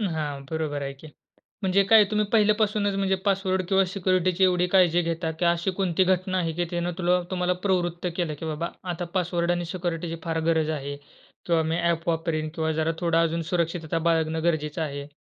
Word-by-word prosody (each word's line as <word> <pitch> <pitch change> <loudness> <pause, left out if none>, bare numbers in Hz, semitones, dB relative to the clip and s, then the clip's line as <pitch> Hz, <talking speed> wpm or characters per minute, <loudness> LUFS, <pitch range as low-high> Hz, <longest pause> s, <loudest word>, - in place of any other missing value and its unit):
अ, - - 0
हां 145 -3 -4
बरोबर 155 -3 -2
आहे 140 0 -3
की. 140 +3 -14 0.6
म्हणजे 190 +1 +3
काय 215 +2 +7
तुम्ही 210 0 +2
पहिल्यापासूनच 210 -1 +2
म्हणजे 195 -1 +1
पासवर्ड 190 -1 +1
किंवा 195 -1 +4
सिक्युरिटीची 185 -1 +1
एवढी 180 -1 +3
काळजी 175 -2 +5
घेता 165 -1 -2
की 175 - +1
अशी 170 +2 +1
कोणती 185 -1 +2
घटना 185 0 +1
आहे 165 -2 0
की 175 - +2
त्यांनी 175 0 -1
तुला 180 0 +2
तुम्हाला 180 0 +1
प्रवृत्त 175 -2 0
केलं 170 -4 -1
की - - -5
बाबा 160 +2 -3 0.2
आता 175 +1 -4
पासवर्ड 175 -1 0
आणि 175 0 -1
सिक्युरिटीची 170 -2 -3
फार 165 -1 -1
गरज 160 -2 +2
आहे 140 +1 -5 0.5
किंवा 170 -2 +2
मी 160 +1 -1
ॲप 170 -1 0
वापरीन 160 -1 -1
किंवा 160 -1 0
जरा 160 +1 +1
थोडा 165 -1 +2
अजून 165 0 0
सुरक्षितता 165 -2 -1
बाळगणं 160 -1 +1
गरजेचं 155 -2 0
आहे. 140 -2 -4
170 Hz, 190 wpm, -25 LUFS, 160-185 Hz, 0.6 s, काय